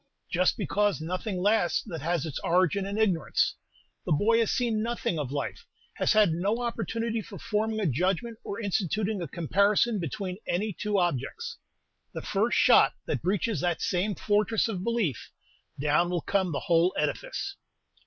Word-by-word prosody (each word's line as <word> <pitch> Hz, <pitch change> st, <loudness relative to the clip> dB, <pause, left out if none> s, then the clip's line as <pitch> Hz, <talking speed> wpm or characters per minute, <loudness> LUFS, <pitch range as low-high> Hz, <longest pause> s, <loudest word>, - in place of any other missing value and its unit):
"Just 180 Hz, +1 st, +2 dB
because 205 Hz, -1 st, +1 dB
nothing 185 Hz, +5 st, -3 dB
lasts 205 Hz, -4 st, +2 dB
that 165 Hz, -8 st, -6 dB
has 170 Hz, 0 st, 0 dB
its 155 Hz, -4 st, -4 dB
origin 185 Hz, +2 st, +2 dB
in 200 Hz, +1 st, -3 dB
ignorance. 195 Hz, -7 st, +2 dB, 0.5 s
The -, -, -4 dB
boy 220 Hz, +9 st, +4 dB
has 230 Hz, -, +2 dB
seen 235 Hz, -4 st, 0 dB
nothing 230 Hz, -7 st, -1 dB
of 135 Hz, -3 st, -3 dB
life, 145 Hz, -, -4 dB, 0.3 s
has -, -, +2 dB
had 215 Hz, -5 st, +5 dB
no 195 Hz, +7 st, 0 dB
opportunity 230 Hz, -1 st, -2 dB
for 205 Hz, -1 st, -10 dB
forming 220 Hz, -1 st, -1 dB
a 210 Hz, -, 0 dB
judgment 185 Hz, -, 0 dB
or 200 Hz, -, -5 dB
instituting 205 Hz, 0 st, -1 dB
a 170 Hz, -, -3 dB
comparison 200 Hz, -, +2 dB
between 180 Hz, +3 st, -4 dB
any 205 Hz, +4 st, -1 dB
two 210 Hz, +3 st, -1 dB
objects. 175 Hz, -9 st, -2 dB, 0.6 s
The -, -, -4 dB
first -, -, +1 dB
shot -, -, +6 dB
that -, -, -2 dB
breaches 195 Hz, +4 st, 0 dB
that 175 Hz, -2 st, 0 dB
same 190 Hz, +3 st, 0 dB
fortress 210 Hz, +2 st, +1 dB
of 190 Hz, -5 st, -4 dB
belief, 225 Hz, -, -1 dB, 0.5 s
down 150 Hz, +4 st, +2 dB
will 175 Hz, -2 st, -1 dB
come 190 Hz, 0 st, 0 dB
the 140 Hz, -, -2 dB
whole 170 Hz, +2 st, +3 dB
edifice!" 450 Hz, -5 st, -2 dB
195 Hz, 165 wpm, -28 LUFS, 175-220 Hz, 0.6 s, shot